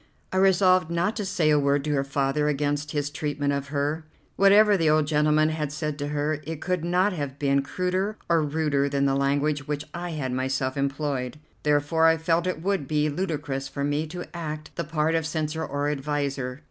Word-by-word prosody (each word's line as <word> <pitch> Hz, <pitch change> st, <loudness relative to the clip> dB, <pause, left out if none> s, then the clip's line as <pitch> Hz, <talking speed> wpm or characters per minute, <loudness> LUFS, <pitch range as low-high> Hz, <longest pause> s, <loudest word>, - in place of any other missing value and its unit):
I -, -, 0 dB
resolved 185 Hz, -2 st, +4 dB
not 170 Hz, +5 st, 0 dB
to 210 Hz, -, -2 dB
say 175 Hz, -5 st, +1 dB
a 150 Hz, -, +4 dB
word 140 Hz, 0 st, +2 dB
to 150 Hz, -, -2 dB
her 135 Hz, -1 st, +1 dB
father 135 Hz, +2 st, 0 dB
against 145 Hz, 0 st, -1 dB
his 145 Hz, -1 st, -2 dB
treatment 145 Hz, -2 st, -1 dB
of 140 Hz, 0 st, -3 dB
her. 145 Hz, +2 st, -1 dB, 0.3 s
Whatever 205 Hz, +1 st, +6 dB
the 165 Hz, -4 st, +2 dB
old 155 Hz, 0 st, +3 dB
gentleman 155 Hz, +1 st, +3 dB
had 155 Hz, -2 st, -2 dB
said 150 Hz, -1 st, -4 dB
to 145 Hz, -, -2 dB
her, 150 Hz, +1 st, -1 dB
it 160 Hz, -2 st, -4 dB
could 180 Hz, -1 st, -1 dB
not 180 Hz, +4 st, +2 dB
have 145 Hz, -5 st, -4 dB
been 140 Hz, -1 st, +2 dB
cruder 185 Hz, +8 st, -2 dB
or 170 Hz, -1 st, +3 dB
ruder 145 Hz, -2 st, 0 dB
than 140 Hz, 0 st, +1 dB
the 135 Hz, -, +2 dB
language 140 Hz, +1 st, 0 dB
which 145 Hz, 0 st, -3 dB
I 175 Hz, -1 st, -4 dB
had 135 Hz, -5 st, -3 dB
myself 130 Hz, +1 st, -1 dB
employed. 140 Hz, -1 st, -2 dB, 0.2 s
Therefore 150 Hz, +2 st, +3 dB
I 165 Hz, 0 st, +4 dB
felt 165 Hz, +2 st, +1 dB
it 170 Hz, -3 st, -3 dB
would 190 Hz, -7 st, 0 dB
be 150 Hz, 0 st, +1 dB
ludicrous 145 Hz, -5 st, -3 dB
for 140 Hz, +1 st, -4 dB
me 145 Hz, +2 st, 0 dB
to 175 Hz, +3 st, -6 dB
act 155 Hz, -3 st, -6 dB
the 170 Hz, -, -2 dB
part 155 Hz, +1 st, 0 dB
of 160 Hz, -1 st, 0 dB
censor 160 Hz, 0 st, -2 dB
or 145 Hz, -1 st, -2 dB
adviser. 140 Hz, -2 st, -2 dB
150 Hz, 200 wpm, -25 LUFS, 140-165 Hz, 0.3 s, Whatever